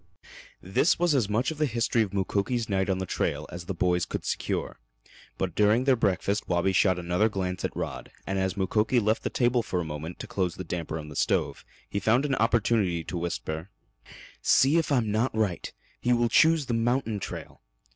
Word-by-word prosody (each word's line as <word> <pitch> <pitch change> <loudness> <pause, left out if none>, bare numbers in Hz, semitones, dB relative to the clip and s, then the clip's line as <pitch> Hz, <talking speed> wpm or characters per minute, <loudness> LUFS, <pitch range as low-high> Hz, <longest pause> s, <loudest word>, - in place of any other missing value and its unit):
This 95 - +2
was 175 -2 +2
as 120 -7 +1
much 115 +8 +1
of 155 - -8
the 155 - +2
history 115 -1 +1
of 105 -4 -1
Mukoki's 100 +5 -1
night 95 -1 0
on 95 - +1
the 95 - -3
trail - - -2
as 90 -1 -7
the 95 - -3
boys 90 0 +1
could - - -4
secure, - - -2 0.6
but 95 -3 -2
during 105 +5 +3
their 135 -1 +4
breakfast 100 -1 0
Wabi 90 +2 +2
shot 95 -1 +3
another 90 +5 +1
glance 90 -3 -3
at - - -3
Rod, - - -5 0.2
and 95 0 -1
as 95 0 -1
Mukoki 105 +5 +2
left 110 0 +1
the - - -2
table 120 -1 +2
for 95 -5 -2
a 85 - -2
moment 80 +2 -6
to - - -7
close 90 -3 -2
the 95 - -6
damper 85 -2 -4
in 75 -1 -7
the 75 - -10
stove - - 0 0.2
he 100 - -2
found 115 +7 +2
an 140 - 0
opportunity 110 -7 +1
to 90 - -6
whisper: 80 +1 -4 0.7
"See 140 +5 +4
if 165 -2 0
I'm 120 -6 +2
not 110 +2 0
right. 105 -6 -1 0.3
He 125 - +2
will 120 -1 +2
choose 160 +4 +4
the 125 - -2
mountain 115 -1 0
trail." - - -7
105 Hz, 205 wpm, -27 LUFS, 90-120 Hz, 0.7 s, their